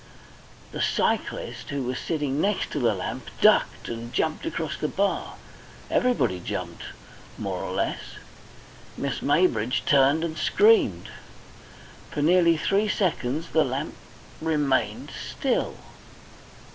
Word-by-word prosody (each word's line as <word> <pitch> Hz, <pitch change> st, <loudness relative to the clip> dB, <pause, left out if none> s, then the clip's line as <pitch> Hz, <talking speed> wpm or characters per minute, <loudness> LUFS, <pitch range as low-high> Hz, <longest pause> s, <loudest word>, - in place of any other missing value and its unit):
The -, -, -4 dB
cyclist, -, -, -1 dB
who 140 Hz, -2 st, -2 dB
was 125 Hz, +1 st, -3 dB
sitting 145 Hz, -3 st, -1 dB
next 205 Hz, 0 st, 0 dB
the 150 Hz, -, -2 dB
lamp, 110 Hz, -7 st, -1 dB
ducked -, -, +4 dB
and 115 Hz, 0 st, -6 dB
jumped 155 Hz, +5 st, -1 dB
across 155 Hz, -3 st, -3 dB
the 150 Hz, -, -2 dB
bar. 200 Hz, +5 st, -1 dB, 0.6 s
Everybody 245 Hz, -, +2 dB
jumped, -, -, -5 dB, 0.5 s
more -, -, -3 dB
or -, -, -4 dB
less. -, -, -3 dB, 0.8 s
Miss 140 Hz, -1 st, -2 dB
Maybridge 130 Hz, -8 st, +2 dB
turned 145 Hz, 0 st, +4 dB
and 160 Hz, -2 st, -3 dB
screamed. 445 Hz, +2 st, +4 dB, 1.0 s
For 145 Hz, -, -2 dB
nearly 170 Hz, 0 st, +5 dB
three 200 Hz, +6 st, +1 dB
seconds 160 Hz, -6 st, -1 dB
the 160 Hz, -, +3 dB
lamp 135 Hz, +2 st, -3 dB, 0.5 s
remained 150 Hz, -4 st, 0 dB
still. -, -, -2 dB
150 Hz, 115 wpm, -25 LUFS, 130-170 Hz, 1.0 s, nearly